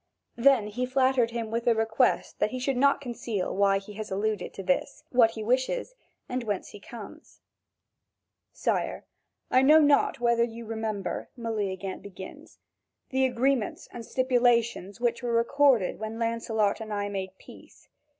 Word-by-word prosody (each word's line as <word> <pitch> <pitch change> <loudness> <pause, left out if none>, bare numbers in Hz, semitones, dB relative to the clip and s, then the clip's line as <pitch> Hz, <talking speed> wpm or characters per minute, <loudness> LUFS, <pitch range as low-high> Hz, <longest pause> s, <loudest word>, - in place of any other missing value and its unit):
Then 260 -2 +4
he 245 +4 -3
flattered 260 -2 +2
him 230 -2 -4
with 230 +1 -2
the 235 -2 +4
request 225 +3 +1
that - - +2
he 255 - -5
should 265 +1 -1
not 280 +2 +3
conceal 235 -6 -3
why 195 0 +3
he 195 +1 -9
has 215 +1 -6
alluded 205 0 -2
to 195 - -6
this, 180 -1 -1
what 240 -3 +5
he 220 - -4
wishes, 260 - 0 0.3
and 250 0 -3
whence 205 -4 -3
he 205 - -11
comes. 235 +8 -12 1.1
"Sire, - - -2 0.5
I 255 - +5
know 300 +4 +7
not 290 -5 +4
whether 235 -1 +3
you 235 0 -5
remember," 220 -3 -4
Meleagant 200 -5 -3
begins, 190 -1 -11 0.5
"the 265 0 +2
agreements 250 -2 0
and 235 - -7
stipulations 235 -5 +1
which 240 0 0
were 240 -1 -2
recorded 240 -2 +3
when 220 +1 -5
Lancelot 230 -2 0
and 215 -1 -7
I 205 -1 -1
made 190 -1 -5
peace. - - -16
230 Hz, 155 wpm, -27 LUFS, 210-250 Hz, 1.1 s, know